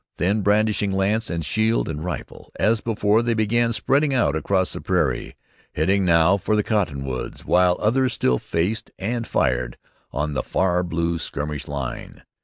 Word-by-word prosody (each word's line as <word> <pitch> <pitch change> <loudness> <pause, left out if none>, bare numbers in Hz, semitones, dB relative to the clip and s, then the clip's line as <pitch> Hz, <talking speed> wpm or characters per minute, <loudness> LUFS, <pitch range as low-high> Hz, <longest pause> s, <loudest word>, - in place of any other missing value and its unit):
Then, 100 +4 +1
brandishing 105 0 +2
lance 100 +4 0
and 85 -2 -3
shield 110 +4 +1
and 75 -1 -4
rifle, 90 - -7
as 110 0 +2
before, 110 -1 +2
they 120 -1 0
began 115 +2 +2
spreading 135 +6 +1
out 80 - +2
across 95 +4 0
the - - -6
prairie, 80 -10 -1 0.4
heading 95 +6 +2
now 85 +2 +4
for 105 +2 0
the 105 - +2
cottonwoods, 70 - -2
while 90 0 +3
others 125 +3 +2
still 60 -1 +1
faced 95 +7 -2
and 115 +4 -3
fired - - 0 0.3
on 75 +2 -2
the 65 - 0
far 90 +4 +1
blue 85 -1 -1
skirmish 75 -2 -4
line. 70 -3 -6
95 Hz, 160 wpm, -23 LUFS, 80-110 Hz, 0.4 s, now